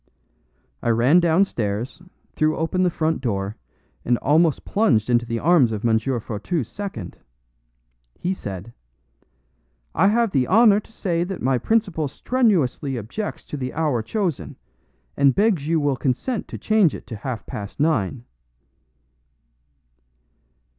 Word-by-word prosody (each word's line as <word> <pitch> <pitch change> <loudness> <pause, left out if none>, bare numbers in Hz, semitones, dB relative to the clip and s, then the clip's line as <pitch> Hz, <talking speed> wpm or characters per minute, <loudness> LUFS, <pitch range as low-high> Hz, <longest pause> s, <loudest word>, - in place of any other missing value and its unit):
I - - -1
ran 120 +9 +4
downstairs, 145 - 0 0.3
threw 155 0 +1
open 165 +3 0
the 180 - +3
front 160 -2 -1
door, 100 -4 -2 0.5
and 120 0 +2
almost 155 +3 +2
plunged 125 - +2
into 120 0 +2
the 115 0 -2
arms 150 -4 +4
of 110 +1 -4
M. 110 -1 +3
Fourtou's 120 - -3
second. 120 - -7 1.0
He 180 - -1
said: 100 - -7 1.2
"I - - +3
have 230 +1 +2
the 130 -6 +1
honor 210 +1 +6
to 215 - -16
say 175 -6 -1
that 190 +1 -6
my 130 -1 +2
principal 190 - 0
strenuously 155 - 0
objects 120 - -5
to 150 - -6
the 130 -2 -5
hour 150 -7 0
chosen, 155 - -3 0.6
and 140 -1 +4
begs 195 -8 +2
you 165 0 +2
will 145 -2 +1
consent 145 - -2
to - - -7
change 215 -7 +2
it - - -10
to 115 - -7
half 120 +1 -5
past 100 +4 -7
nine." 130 - 0
145 Hz, 135 wpm, -22 LUFS, 115-185 Hz, 1.2 s, honor